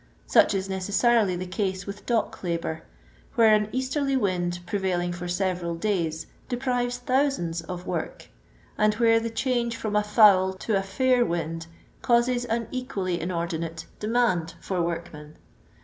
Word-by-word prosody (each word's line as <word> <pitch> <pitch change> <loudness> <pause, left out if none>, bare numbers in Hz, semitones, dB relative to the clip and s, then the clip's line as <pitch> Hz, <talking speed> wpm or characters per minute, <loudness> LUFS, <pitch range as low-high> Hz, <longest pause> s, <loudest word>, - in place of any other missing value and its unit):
Such - - +4
is 190 0 -1
necessarily 200 +2 +2
the 180 +1 -4
case 190 0 -2
with 200 0 -8
dock 230 -3 0
labour, 170 -2 -2 0.5
where 225 -2 +6
an 210 0 +2
easterly 265 +2 0
wind 180 -5 0
pre 205 - -2
vailing 175 -2 -1
for 175 0 -6
several 175 -2 -1
days 165 -4 -1 0.2
deprives 245 -1 -1
thousands 250 - 0
of 175 +2 -7
trort, - - -4 0.5
and 215 0 +3
when 225 0 +4
the 230 - -2
change 235 0 -1
from 215 -2 -3
a 210 - +4
foul 205 -3 +5
to 205 +3 -2
a 195 - +2
fair 245 +6 +2
wind 165 -3 -3 0.3
causes 245 +1 +2
an 230 -1 -1
equally 195 -10 -2
inordinate 170 -2 -3
demand 210 -7 +1
for 185 -2 -2
workmen. 165 -3 -5
195 Hz, 150 wpm, -26 LUFS, 175-235 Hz, 0.5 s, where